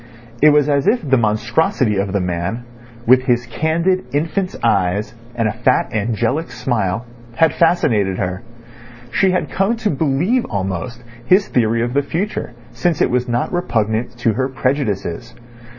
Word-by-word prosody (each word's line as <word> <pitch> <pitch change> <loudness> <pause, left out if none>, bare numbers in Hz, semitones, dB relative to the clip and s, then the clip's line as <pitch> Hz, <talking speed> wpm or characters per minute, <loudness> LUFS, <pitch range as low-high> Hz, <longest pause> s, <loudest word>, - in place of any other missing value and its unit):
It 155 - +8
was 150 -1 +4
as 140 +1 +1
if 215 -6 +2
the 135 - +4
monstrosity 120 - +1
of 100 0 -1
the 100 - 0
man, 90 +6 -3 0.4
with 130 +2 +5
his 125 -1 +1
candid 165 +9 0
infant's 170 +5 -1
eyes 100 -1 +1 0.2
and 115 -2 +1
a 105 - -1
fat - - +1
angelic 115 +8 -1
smile, 120 -4 -2 0.3
had 160 +4 +3
fascinated 110 - +2
her. 90 -1 -3 0.7
She 190 - +3
had 185 0 -1
come 195 +5 +1
to 225 -2 -1
believe 160 - +1
almost 100 +4 -4 0.2
his 195 +2 +4
theory 115 -1 +1
of 120 +1 -2
the 140 - +3
future, 175 +9 -3 0.2
since 145 +7 -1
it - - +2
was 125 +1 0
not 120 +7 -1
repugnant 115 -8 -1
to 120 -2 +1
her 130 +4 -1
prejudices. 130 - -2
125 Hz, 155 wpm, -18 LUFS, 110-160 Hz, 0.7 s, It